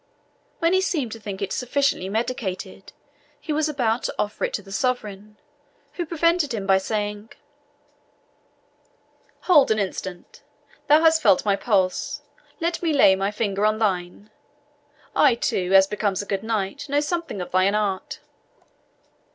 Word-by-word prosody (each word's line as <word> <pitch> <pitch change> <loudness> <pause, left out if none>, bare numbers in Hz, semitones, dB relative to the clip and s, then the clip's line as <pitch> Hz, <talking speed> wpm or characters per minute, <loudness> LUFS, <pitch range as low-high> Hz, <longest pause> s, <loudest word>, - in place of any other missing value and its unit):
When 335 +1 +1
he 375 - +3
seemed 295 - -1
to 225 - -7
think 200 -2 -6
it 195 - -3
sufficiently 255 -6 0
medicated, 220 -3 -4 0.5
he 310 - -4
was 310 +1 0
about 245 -5 0
to - - -3
offer 210 +1 -3
it - - -5
to 205 - -5
the 195 - -14
sovereign, 210 -3 -3 0.6
who 345 -2 -4
prevented 335 -4 +1
him 200 -3 -4
by 195 -1 +4
saying, 210 +1 -4 2.1
"Hold 305 -7 +5
an 220 - +2
instant. 190 -3 -5 0.5
Thou 300 +2 +6
hast 320 0 +4
felt 185 - +4
my 200 -1 +3
pulse 195 -4 -1 0.4
let 335 0 -1
me 330 -3 0
lay 230 -9 +6
my 195 +1 -1
finger 205 -1 -2
on 215 0 +2
thine. 200 -1 -2 0.8
I 270 -5 +5
too, 185 -5 -1
as 190 0 +8
becomes 205 -1 -2
a - - -11
good 195 -1 -2
knight, 220 +3 -3
know 285 +1 +2
something 330 - -3
of 180 - -6
thine 185 +2 +2
art." 200 -3 -2
215 Hz, 150 wpm, -23 LUFS, 195-285 Hz, 2.1 s, as